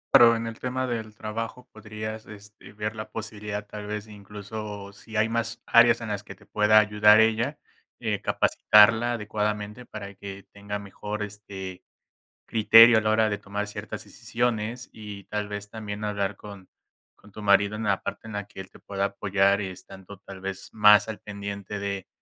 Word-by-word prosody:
Pero, 115 -1 +8
en 115 0 -3
el 115 0 -7
tema 130 +1 -2
del 110 -3 -4
trabajo, 115 +3 -6
podrías, 110 0 -7
este, 105 0 -13
ver 105 +2 -4
la 110 - -6
posibilidad, 105 -2 -6
tal 105 0 -8
vez 105 0 -4
incluso, 105 0 -8
si 110 +2 -8
hay 110 +1 +3
más 115 0 -3
áreas 120 0 +6
en 115 - -5
las 105 -1 -3
que - - -10
te - - -21
pueda 105 0 +4
ayudar 105 0 +6
ella. 110 +1 +2 0.4
Eh, - - -2
capacitarla 110 +3 +4
adecuadamente 105 +1 -3
para 100 -2 -8
que 100 0 -9
tenga 100 0 -5
mejor, 105 +1 -6
este, 100 -3 -8 0.6
criterio 115 +1 +7
a - - +3
la 110 0 0
hora 110 0 +3
de 100 - -2
tomar 100 +1 -4
ciertas 105 - -7
decisiones 120 0 -3
y 105 -2 -9
tal 105 +1 -4
vez, 105 0 -6
también 105 -1 -6
hablar 100 -1 -2
con 100 -3 -12 0.5
con 105 - -19
tu 105 - -9
marido 100 +1 +3
en 110 - -4
la 100 -2 +1
parte - - -6
en 110 - -8
la 105 0 -4
que 100 -1 -11
él 95 - -8
te - - -16
pueda 100 0 -2
apoyar 100 0 +1
estando 95 +1 -9
tal 95 -1 -12
vez 95 0 -5
más 105 -1 +6
al 110 - -5
pendiente 100 0 -6
de 100 -1 -4
105 Hz, 180 wpm, -26 LUFS, 100-110 Hz, 0.6 s, Pero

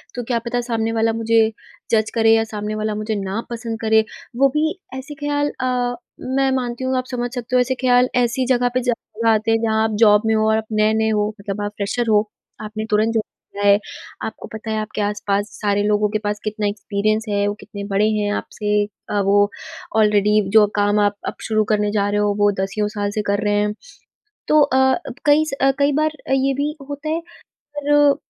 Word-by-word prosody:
तो 245 - -3
क्या 235 0 -1
पता 245 +1 0
सामने 225 0 0
वाला 225 0 +2
मुझे 225 0 +2 0.5
जज़ 220 -1 +2
करे, 225 0 +5
या 225 - +2
सामने 210 -1 -5
वाला 215 0 -2
मुझे 215 +1 -2
ना 195 +4 -3
पसंद 230 -1 -4
करे। 220 0 +4 0.3
वो 275 +1 +5
भी 315 +3 +1 0.2
ऐसे 285 +3 -8
ख़्याल 290 0 0
अ, 250 -1 0 0.4
मैं 270 -1 +2
मानती 250 -1 -2
हूँ, 260 0 0
आप 255 - -1
समझ 245 -1 -2
सकते 245 +1 -3
हो, - - +5
ऐसे 260 +1 0
ख़्याल 250 0 +4
ऐसी 250 +1 +1
जगह 245 -1 +2
पे 255 - +1
ज़रूर 230 -2 -2
आते 220 +1 +2
हैं, 225 - +4
जहाँ 220 0 +2
आप 220 - 0
जॉब 210 -2 +6
में 220 - +2
हो 215 0 +2
और 220 - +3
आप 220 - -3
नए-नए 220 +1 +2
हो। 210 -1 +1
मतलब 200 +1 -4
आप 205 0 -2
फ़्रेशर 225 +4 -1
हो, 210 0 +3 0.3
आपने 215 0 -5
तुरंत 215 +2 +2
जॉब 220 -1 +1 0.3
किया 205 0 -4
है। 200 +1 +6 0.5
आपको 220 - -8
पता 220 0 -5
है, 220 - -1
आपके 215 0 -4
आस-पास 205 0 -1
सारे 205 0 +1
लोगों 210 0 +2
के 215 0 -1
पास 210 0 -2
कितना 215 0 -2
एक्सपीरियंस 210 +1 -1
है, 205 0 +1
वो 205 - 0
कितने 200 -1 -8
बड़े 210 +2 +3
हैं 205 0 0
आपसे। 210 -1 -1 0.3
अ, 205 - 0
वो 205 +1 +4 0.5
ऑलरेडी, 210 0 +4
जो 215 0 +6
काम 205 0 +2
आप 205 0 +2
अब - - -3
शुरू 215 -1 +2
करने 210 0 +1
जा 205 -1 +1
रहे 205 0 0
हो, 205 -1 +2
वो 205 0 +4
दसियों 205 +2 -1
साल 205 0 -1
से 215 - -1
कर 205 +1 0
रहे 205 - +1
हैं। 210 0 0 0.7
तो 305 0 +5
अ, 265 -2 +3 0.3
कई 300 +1 +5
स - - -6
अ, 270 0 +5
कई 285 +1 +3
बार 310 0 +2 0.2
अ, - - -1
ये 270 0 +2
भी 290 +3 -2
होता 285 +2 -5
है, 330 +2 -1 0.6
पर 290 -1 +4
220 Hz, 215 wpm, -20 LUFS, 210-245 Hz, 0.7 s, जॉब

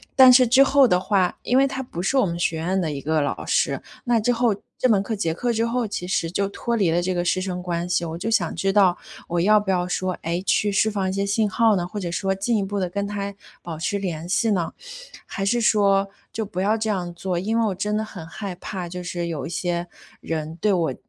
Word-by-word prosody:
但 260 -1 +9
是 255 0 +6
之 260 +4 +6
后 275 -1 +5
的 180 -4 +3
话， 185 -1 +1
因 250 - +2
为 275 - +5
他 265 0 -4
不 175 -9 -6
是 270 +8 +1
我 260 - +4
们 170 -2 -3
学 165 -1 0
院 180 +4 0
的 165 -4 -1
一 140 -2 -5
个 155 +1 +1
老 145 - -3
师， - - +1 0.2
那 240 -2 +3
之 245 +3 +1
后 235 -2 +2 0.2
这 255 - +2
门 200 -3 +4
课 220 +1 -3
结 165 -5 -1
课 240 +7 -1
之 225 +1 +1
后， 235 -1 -1
其 180 - -4
实 175 -2 0
就 200 +1 0
脱 235 +3 -2
离 195 -7 +2
了 175 +2 +2
这 185 +1 -1
个 175 -1 0
师 180 - +1
生 180 -1 -4
关 175 -1 -2
系， 175 -1 0
我 165 0 -5
就 215 - -3
想 180 -7 +1
知 195 0 0
道 190 -4 +4 0.3
我 175 0 0
要 210 +4 +5
不 205 -2 -2
要 180 -1 0
说， 185 +1 -1
哎， 170 +2 -1
去 205 - +2
释 220 +2 +2
放 195 -2 -1
一 185 - -1
些 200 +1 0
信 205 +1 +1
号 220 0 +3
呢？ 175 0 -2
或 210 - -8
者 175 -3 -4
说 195 +2 -1
进 215 +4 0
一 200 - 0
步 200 +1 -4
地 185 -2 -1
跟 200 +2 -2
他 200 -1 -4 0.3
保 165 -2 -6
持 200 +5 -1
联 175 -4 -4
系 225 +4 +1
呢？ 175 -5 -1 0.5
还 195 - -4
是 240 +5 +1
说 200 -3 +3 0.2
就 220 -2 -3
不 185 -2 -4
要 210 +3 +2
这 220 0 -2
样 180 -4 -2
做。 180 +1 -3
因 215 +6 0
为 230 - +2
我 190 - -2
真 210 +3 -1
的 220 - -1
很 185 -6 -9
害 195 +3 -6
怕， 180 0 -6
就 180 +1 -6
是 175 0 -3
有 165 -3 -4
一 - - -6
些 175 0 -2 0.3
人 160 -1 -4
对 210 +2 +2
我 165 -7 0
195 Hz, 285 characters per minute, -23 LUFS, 175-215 Hz, 0.5 s, 但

